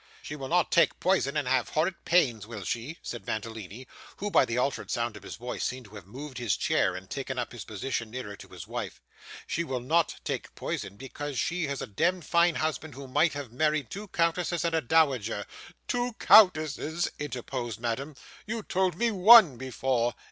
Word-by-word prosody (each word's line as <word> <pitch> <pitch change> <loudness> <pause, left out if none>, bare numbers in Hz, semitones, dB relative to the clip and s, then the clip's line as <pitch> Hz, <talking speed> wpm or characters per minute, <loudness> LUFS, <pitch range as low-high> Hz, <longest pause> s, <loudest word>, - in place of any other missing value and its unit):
'She 150 - -6
will 135 -2 -6
not 175 +3 +2
take 170 -2 +3
poison 170 -6 +1
and 145 -4 -1
have 125 -2 +1
horrid 170 +5 +1
pains, 120 - +2
will 110 -4 -7
she?' 120 - -4
said 120 - -7
Mantalini; 110 +1 -5 0.3
who, 205 +1 -3
by 135 - +5
the 115 -1 -3
altered 135 +2 -1
sound 115 -2 -1
of 105 - -10
his 100 - -8
voice, 120 +2 -5
seemed 130 -1 -3
to 105 - -16
have 100 -3 -11
moved 130 +4 -8
his 120 -6 0
chair, 90 - +1
and 95 +1 -8
taken 135 +1 -4
up 125 - -3
his 120 -4 -7
position 115 +2 -3
nearer 110 -4 -6
to - - -13
his - - -10
wife. - - -5 0.5
'She 170 - -1
will 130 -6 -3
not 160 +7 +1
take - - -4
poison, 100 - -4
because 135 +2 -6
she 170 +2 0
had 140 -1 -3
a - - -3
demd 175 - 0
fine 170 0 +3
husband 155 -2 -2
who 140 0 -8
might 150 +5 +2
have 145 -5 -6
married 150 +1 0
two 210 +2 -6
countesses 170 -1 0
and 170 - 0
a 160 - +2
dowager 125 -8 +2 0.2
' - - -21
'Two 245 0 -1
countesses,' 165 -5 +4
interposed 125 -5 -4
Madame. 130 +5 -3 0.3
'You 225 0 -3
told 185 -3 0
me 235 +2 +2
one 205 - +8
before! 125 -1 -1
135 Hz, 200 wpm, -28 LUFS, 120-165 Hz, 0.5 s, one